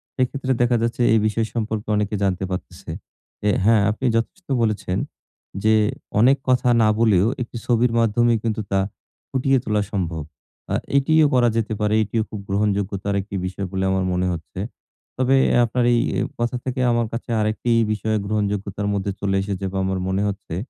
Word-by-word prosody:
সেক্ষেত্রে 130 Hz, +1 st, -1 dB
দেখা 120 Hz, 0 st, +3 dB
যাচ্ছে 115 Hz, +1 st, -1 dB
এই 110 Hz, -, +5 dB
বিষয় 110 Hz, +1 st, +1 dB
সম্পর্কে 110 Hz, -2 st, -3 dB
অনেকে 105 Hz, 0 st, 0 dB
জানতে 95 Hz, -1 st, 0 dB
পারতেছে। 90 Hz, -, -6 dB, 0.5 s
যে 105 Hz, -, +1 dB, 0.2 s
হ্যাঁ 110 Hz, -1 st, +5 dB
আপনি 120 Hz, +5 st, -4 dB
যথেষ্ট 115 Hz, +11 st, -2 dB, 0.2 s
বলেছেন। 105 Hz, -4 st, -1 dB, 0.7 s
যে 110 Hz, 0 st, +4 dB, 0.5 s
অনেক 130 Hz, +5 st, +5 dB
কথা 125 Hz, -1 st, +3 dB
না 110 Hz, -, +4 dB
বলেও 105 Hz, -4 st, +4 dB
একটি 120 Hz, 0 st, -5 dB
ছবির 120 Hz, 0 st, +2 dB
মাধ্যমেই 115 Hz, +1 st, +3 dB
কিন্তু 110 Hz, -1 st, -1 dB
তা 95 Hz, -, +3 dB, 0.5 s
ফুটিয়ে 135 Hz, +1 st, +2 dB
তোলা 105 Hz, -3 st, 0 dB
সম্ভব। 85 Hz, -5 st, -2 dB, 0.5 s
আ -, -, +2 dB, 0.2 s
এটিও 155 Hz, +3 st, +4 dB
করা 125 Hz, -1 st, +4 dB
যেতে 110 Hz, -1 st, -1 dB
পারে। 105 Hz, 0 st, +1 dB
এটিও 110 Hz, +2 st, -1 dB
খুব 105 Hz, -, -6 dB
গ্রহণযোগ্যতার 100 Hz, 0 st, 0 dB
একটি 100 Hz, +1 st, -8 dB
বিষয় 95 Hz, +1 st, -4 dB
বলে 95 Hz, -1 st, -1 dB
আমার 95 Hz, 0 st, +1 dB
মনে 90 Hz, +1 st, 0 dB
হচ্ছে। 85 Hz, +2 st, -8 dB, 0.6 s
তবে 130 Hz, +1 st, +3 dB, 0.2 s
এ -, -, +3 dB
আপনার 120 Hz, +2 st, 0 dB
এই 120 Hz, -, +3 dB, 0.4 s
কথা 120 Hz, +1 st, 0 dB
থেকে 130 Hz, 0 st, -3 dB
আমার 120 Hz, -1 st, +1 dB
কাছে 115 Hz, -, -5 dB
আরেকটি 110 Hz, +3 st, 0 dB, 0.2 s
বিষয় 110 Hz, +1 st, -1 dB
গ্রহণযোগ্যতার 100 Hz, -1 st, -2 dB
মধ্যে 100 Hz, 0 st, -1 dB
চলে 95 Hz, -1 st, 0 dB
এসেছে 100 Hz, -1 st, -3 dB
বা 95 Hz, -, -4 dB
আমার 95 Hz, 0 st, -1 dB
মনে 95 Hz, +1 st, 0 dB
হচ্ছে। 100 Hz, -4 st, -5 dB
110 Hz, 170 wpm, -22 LUFS, 100-120 Hz, 0.7 s, এই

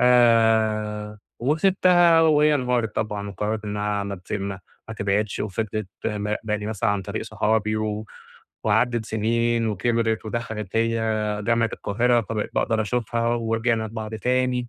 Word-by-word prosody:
آآ 110 Hz, -3 st, +3 dB, 0.2 s
وسيبتها 175 Hz, +2 st, +4 dB
وهي 150 Hz, -1 st, +4 dB
انهارت 125 Hz, -5 st, 0 dB
طبعًا، 105 Hz, -2 st, -2 dB
وقررِت 105 Hz, +2 st, -3 dB
إنها 105 Hz, 0 st, -2 dB
ما 100 Hz, 0 st, -4 dB
تس 90 Hz, 0 st, -11 dB
ما 100 Hz, -2 st, -3 dB, 0.4 s
تبعِدش 100 Hz, +1 st, 0 dB
وفضِلِت 110 Hz, 0 st, -3 dB, 0.2 s
مراقباني 105 Hz, 0 st, -2 dB
مثلًا 105 Hz, -2 st, 0 dB
عن 100 Hz, -1 st, -1 dB
طريق -, -, -4 dB
صحابي، 110 Hz, 0 st, 0 dB
و 110 Hz, 0 st, -3 dB, 0.6 s
وعَدَّت 110 Hz, +1 st, +2 dB
سنين 115 Hz, +1 st, 0 dB
وكِبرِت، 115 Hz, +2 st, 0 dB
ودخلِت 110 Hz, -3 st, -4 dB
هي 115 Hz, 0 st, +1 dB, 0.5 s
جامعة 115 Hz, -1 st, +2 dB
القاهرة 120 Hz, +3 st, +1 dB
فبقيت 110 Hz, 0 st, -3 dB
باقدَر 110 Hz, -1 st, +1 dB
أشوفها، 115 Hz, +1 st, -1 dB
ورجِعنا 115 Hz, 0 st, 0 dB
لبعض 110 Hz, 0 st, -6 dB
تاني، 125 Hz, +1 st, 0 dB
110 Hz, 125 wpm, -24 LUFS, 105-120 Hz, 0.6 s, وسيبتها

